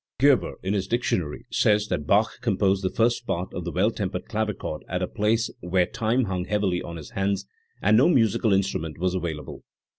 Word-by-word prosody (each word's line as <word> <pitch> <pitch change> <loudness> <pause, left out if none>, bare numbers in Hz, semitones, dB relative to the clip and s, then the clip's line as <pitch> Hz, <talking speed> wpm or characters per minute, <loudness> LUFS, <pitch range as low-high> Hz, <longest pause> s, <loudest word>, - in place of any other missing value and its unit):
Gerber, 140 -1 +3
in 95 +2 0
his 95 -2 -1
Dictionary, 95 -9 -1
says 105 0 +3
that 75 -5 -2
Bach 105 +6 +2
composed 100 -4 +1
the 95 - +1
First 120 +3 +1
Part 90 +2 -2
of 90 - -5
the 85 - -3
Well 95 +7 +2
tempered 100 -4 -4
Clavichord 105 -8 -3
at 90 0 -1
a - - 0
place 110 +4 0
where 90 +1 +1
time 115 +7 0
hung 95 -4 -2
heavily 100 -3 0
on 85 - -7
his 75 - -10
hands 95 0 -1 0.4
and 105 +2 +5
no 135 +8 +5
musical 115 - +3
instrument 95 -5 0
was 90 +1 0
available. 85 -5 -4
95 Hz, 190 wpm, -25 LUFS, 90-110 Hz, 0.4 s, and